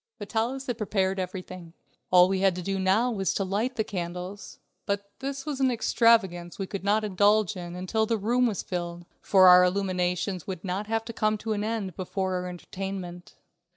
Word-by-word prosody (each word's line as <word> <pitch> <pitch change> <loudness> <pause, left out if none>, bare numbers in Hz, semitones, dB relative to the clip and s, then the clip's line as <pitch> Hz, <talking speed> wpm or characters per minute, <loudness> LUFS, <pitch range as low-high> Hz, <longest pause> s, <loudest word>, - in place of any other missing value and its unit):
Vitalis 235 +5 -2
had 245 -3 -3
prepared 195 -2 0
everything. 185 -2 -6 0.4
All 180 0 +7
we 190 0 0
had 190 -2 +3
to 180 - -5
do 195 +1 -2
now 200 +6 +2
was 195 -4 -1
to 195 - 0
light 210 +7 -1
the 220 - 0
candles, 180 +1 -6 0.3
but 200 0 -2
this 275 0 -5
was 295 -3 -3
an 265 -1 +3
extravagance 220 -7 +2
that - - -20
we 195 - -1
could 195 0 -6
not 210 +2 +2
indulge 205 +1 +2
in 175 -1 -7
until 220 +5 -1
the 230 0 +1
room 240 +4 +2
was 210 -5 -2
filled, 175 -1 -5 0.2
for 190 -2 +5
our 180 0 +9
illuminations 180 -1 -1
would 185 -3 -5
not 195 +2 -3
have 225 0 -1
to 230 - -6
come 215 0 +1
to 220 +1 -3
an 205 -1 -2
end 215 -5 -3
before 190 0 -2
our 180 0 -2
entertainment. 180 0 -7
195 Hz, 195 wpm, -27 LUFS, 180-220 Hz, 0.4 s, our